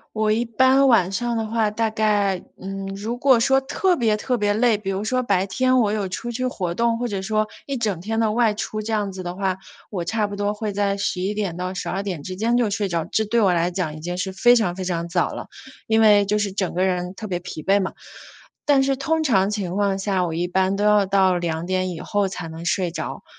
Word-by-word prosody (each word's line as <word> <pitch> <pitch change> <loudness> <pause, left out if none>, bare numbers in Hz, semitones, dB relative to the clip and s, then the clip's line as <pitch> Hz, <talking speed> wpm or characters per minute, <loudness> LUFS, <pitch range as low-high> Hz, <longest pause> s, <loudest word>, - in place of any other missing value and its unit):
我 215 0 +1
一 225 +3 +2
般 260 +4 +4
晚 215 -8 +4
上 235 +4 -1
的 225 - -1
话， 220 -1 0
大 225 +1 0
概， 205 -3 +1 0.2
嗯， 195 0 -5
如 215 +5 -4
果 255 -1 +4
说 270 +3 +4
特 360 +7 +1
别 225 -5 +2
特 245 +3 -1
别 205 -1 +1
累 225 -1 +3
比 205 -2 -7
如 195 +1 -1
说 255 +4 0
白 195 -4 +2
天 255 +6 +2
我 215 -3 +2
有 205 -3 -1
出 235 +6 -5
去 255 +2 -2
活 185 -8 -2
动， 230 +5 +1
或 245 - -1
者 200 -3 -3
说 215 +2 0 0.2
一 275 - -3
整 210 -8 -1
天 225 +5 -2
的 220 -1 +2
外 225 -1 +2
出， 215 0 -4
这 220 +1 -4
样 210 -2 0
子 185 -1 -7
的 175 0 -4
话， 190 -1 -1 0.3
我 180 -5 -3
差 210 +3 0
不 205 - -6
多 205 +1 -1
会 210 -1 -3
在 200 0 0
11 200 0 -1
点 200 -5 -2
到 180 +1 -4
12 190 +1 -3
点 180 -7 -4
之 185 +4 -6
间 230 +4 +1
就 240 -4 +2
睡 205 0 -1
着， 170 -3 -1
这 220 - +1
对 230 +3 +1
我 195 -4 +4
来 175 +1 +1
讲 170 -4 -3
已 - - -8
经 175 +3 -4
是 185 +1 -2
非 240 +5 +5
常 200 -7 +1
非 190 - -4
常 170 -2 -2
早 175 0 0
了， - - -7 0.4
因 220 0 +3
为 210 -2 +6
就 210 +1 0
是 205 -2 -1
整 190 -2 -2
个 180 +2 +1
人 180 -1 -1
特 220 - -6
别 180 -3 -3
疲 160 -3 -8
惫 200 +1 +3
嘛。 190 - -2 0.7
但 280 -2 +4
是 275 0 +1
通 315 +4 0
常 200 -8 +3
情 195 -4 -3
况 200 -1 +1
下， 195 -2 0
我 165 - -4
一 170 +2 -1
般 190 +2 +1
都 205 - 0
要 210 -1 +4
到 190 -1 +3
2 170 -1 -2
点 185 0 0
以 170 - -6
后 205 -2 0
才 180 -2 -6
能 160 +1 -8
睡 175 0 0
着。 160 -2 -5
205 Hz, 265 characters per minute, -22 LUFS, 185-225 Hz, 0.7 s, 为